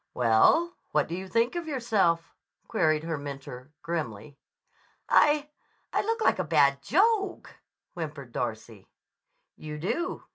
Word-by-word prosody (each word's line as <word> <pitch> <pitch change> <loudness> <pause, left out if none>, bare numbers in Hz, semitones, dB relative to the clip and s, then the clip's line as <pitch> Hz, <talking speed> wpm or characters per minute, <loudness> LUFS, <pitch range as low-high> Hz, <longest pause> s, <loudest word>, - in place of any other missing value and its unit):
"Well, 115 - +5
and 345 - -10 0.2
what 150 -2 +2
do 165 - -6
you 190 +2 -5
think 230 - +1
of 345 -2 -4
yourself?" 210 - 0 0.3
queried 155 -1 +1
her 165 -2 -3
mentor 140 -2 -8
grimly. 145 -6 -4 0.7
"I—I 295 0 +1
look 455 +2 -2
like - - +3
a - - +1
bad 140 -3 +3
joke," 395 - +1 0.4
whimpered 150 -6 -6
Darcy. 110 -4 -5 0.7
"You 150 -1 -7
do. 335 - -3
165 Hz, 130 wpm, -28 LUFS, -, 0.7 s, Well